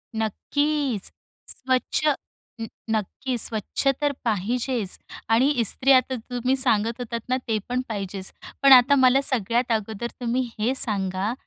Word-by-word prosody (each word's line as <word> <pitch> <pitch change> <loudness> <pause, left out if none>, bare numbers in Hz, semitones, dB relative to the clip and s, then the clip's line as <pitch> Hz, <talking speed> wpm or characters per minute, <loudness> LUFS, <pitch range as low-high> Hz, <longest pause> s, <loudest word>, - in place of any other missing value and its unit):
नक्कीच, 270 +2 -1 0.4
स्वच्छ 260 +2 -1 0.6
न 225 - -3 0.2
नक्की 225 +4 -2
स्वच्छ 220 +4 -1
तर 290 - +2
पाहिजेच 230 0 -1 0.3
आणि 245 +5 +4
इस्त्री 265 +6 +2
आता 255 0 +3
तुम्ही 250 +2 -2
सांगत 230 -2 +1
होतात 235 -1 -4
ना, 255 - +2
ते 220 -2 +1
पण 250 +1 0
पाहिजेच. 195 -2 -4 0.3
पण 275 - +7
आता 260 +3 +7
मला 260 +1 +5
सगळ्यात 240 -1 0
अगोदर 220 +1 -2
तुम्ही 245 +2 0 0.2
हे 240 +5 +1
सांगा, 195 -3 +1
235 Hz, 130 wpm, -24 LUFS, 215-260 Hz, 0.6 s, पण